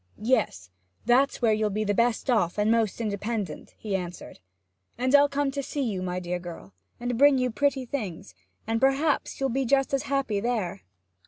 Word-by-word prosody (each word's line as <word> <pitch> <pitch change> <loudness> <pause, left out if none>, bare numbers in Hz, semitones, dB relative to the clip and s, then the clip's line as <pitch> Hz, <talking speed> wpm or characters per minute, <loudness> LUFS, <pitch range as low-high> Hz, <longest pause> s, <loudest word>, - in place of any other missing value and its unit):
'Yes; 210 - 0 0.3
that's 255 +3 +3
where 220 -2 +5
you'll 215 0 +1
be 215 +2 -2
best 230 +5 +1
off 215 -9 +1
and 210 +1 +2
most 230 -3 +1
independent,' 210 -3 -4
he 205 -3 -3
answered. 180 - -6 0.6
'And 255 +2 0
I'll 285 0 +7
come 280 0 0
to 280 +1 -3
see 280 +1 -3
you, 205 -7 -2
my 180 0 -2
dear 180 0 -3
girl, 170 - -10 0.3
and 245 -1 -2
bring 285 -1 +6
you 250 -1 0
pretty 275 +1 0
things; 215 - -5 0.3
and 225 +1 -1
perhaps 275 +3 +1
you'll 270 0 +1
be 270 +2 0
just 270 +2 +2
as 275 - +2
happy 275 -7 0
there.' 200 -5 -2
230 Hz, 180 wpm, -26 LUFS, 200-270 Hz, 0.6 s, I'll